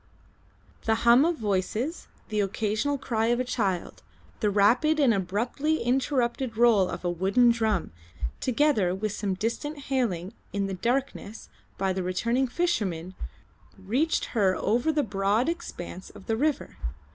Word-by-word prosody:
The 225 - +3
hum 240 +5 +7
of 340 -1 +1
voices, 215 - -2 0.2
the 215 -1 -1
occasional 215 +7 0
cry 225 -4 -1
of 240 +1 +2
a - - +1
child, 200 -8 -2 0.4
the 210 - +2
rapid 245 +10 +3
and 265 -6 +5
abruptly 230 - -1
interrupted 250 -1 0
roll 225 -6 +5
of 175 0 -6
a - - +2
wooden 195 +8 +3
drum, 220 -6 0 0.5
together 250 -8 +2
with 210 +2 -2
some 200 -2 -2
distant 235 +9 -3 0.2
hailing 200 -7 -1 0.2
in 200 -1 0
the 195 - -3
darkness 235 +1 -2 0.3
by 190 -1 0
the 190 - -2
returning 230 +9 0
fishermen, 200 - -1 0.6
reached 245 +12 0
her 195 -5 +3
over 240 +8 +1
the 300 -1 +1
broad 205 +3 +1
expanse 185 - -5
of 190 - -14
the 225 - 0
river. 290 +4 -1
225 Hz, 145 wpm, -27 LUFS, 195-260 Hz, 0.6 s, hum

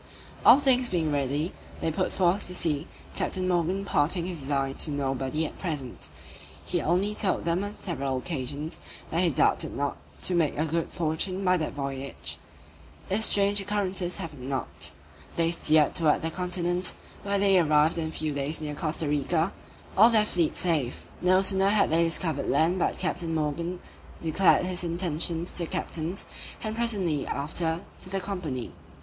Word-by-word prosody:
All 270 - +9
things 255 -3 +3
being 165 -4 0
ready, 145 +4 0 0.3
they 160 - 0
put 185 +4 -1
forth 185 +2 +1
to 180 - -3
sea, 150 -5 -1 0.3
Captain 185 -1 -1
Morgan 180 +2 +1
imparting 170 -2 +1
his 175 -3 -4
design 135 -1 -1
to - - +2
nobody 135 +1 -1
at - - -8
present; 145 -9 -4 0.6
he - - 0
only 185 +6 +1
told 205 -3 0
them 170 +3 +1
on 205 +1 -5
several 140 -7 -2
occasions, 145 +1 -4 0.3
that 165 - +2
he 180 - +4
doubted 145 - +2
not 140 0 -1 0.3
to 185 - +2
make 165 -5 +2
a 155 - +1
good 165 +1 -1
fortune 175 +4 -1
by 180 0 +5
that 155 -3 -2
voyage, 140 -1 -4 0.7
if 210 +3 +2
strange 200 -1 +4
occurrences 195 -3 -1
happened 140 -5 -7
not. 135 -2 -2 0.4
They 165 0 +3
steered 155 -3 +3
towards 160 -4 +2
the 165 - -1
continent, 180 0 -1 0.3
where 200 0 0
they 195 -1 +5
arrived 155 0 +3
in 160 - -1
a - - -5
few 155 -2 -3
days 140 +2 -2
near 150 -1 -4
Costa 155 +1 -2
Rica, 160 +5 +1 0.4
all 220 +4 +8
their 215 -3 +4
fleet 175 -6 +1
safe. 155 -8 -1 0.2
No 185 +1 +4
sooner 195 0 +4
had 205 -5 +3
they 165 +1 +4
discovered 165 -3 -1
land 165 +6 +3
but - - 0
Captain 165 -2 -1
Morgan 165 +4 -2 0.4
declared 170 +3 +3
his 180 -1 -1
intentions 170 0 +1
to - - -1
the - - -9
captains, 165 +5 -3 0.4
and 215 0 -3
presently 200 -11 0
after 160 +3 -1 0.2
to 185 - -8
the 195 0 -1
company. 175 -11 -4
170 Hz, 170 wpm, -27 LUFS, 150-185 Hz, 0.7 s, All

